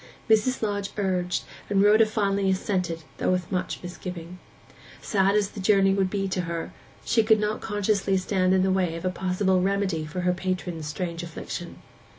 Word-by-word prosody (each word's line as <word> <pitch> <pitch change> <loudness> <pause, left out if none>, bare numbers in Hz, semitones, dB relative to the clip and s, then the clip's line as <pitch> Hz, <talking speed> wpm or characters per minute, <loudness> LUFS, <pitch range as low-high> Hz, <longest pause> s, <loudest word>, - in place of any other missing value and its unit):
Mrs. 220 +3 +3
Lodge 205 -2 -1
urged, 180 -3 0 0.3
and 200 -1 +3
Rhoda 215 +2 +6
finally 200 -2 +1
assented, 185 -3 -1 0.2
though - - +1
with 180 -1 0
much 185 -1 -2
misgiving. 180 0 -7 0.6
Sad 195 -1 +2
as 205 -2 +2
the 210 - -8
journey 195 0 +4
would 195 -1 +1
be 195 0 -1
to 185 -1 -1
her, 170 -1 -4 0.3
she 230 - +3
could 220 0 +4
not 210 +1 -1
conscientiously 205 -2 +1
stand 185 0 +2
in 185 - +3
the 190 - +2
way 185 -3 +1
of 165 +2 -6
a 185 - +1
possible 185 +1 +1
remedy 195 -4 0
for 155 +4 -4
her 180 0 +2
patron's 180 -3 -3
strange 170 +2 -4
affliction. 170 0 -7
190 Hz, 175 wpm, -26 LUFS, 180-200 Hz, 0.6 s, Rhoda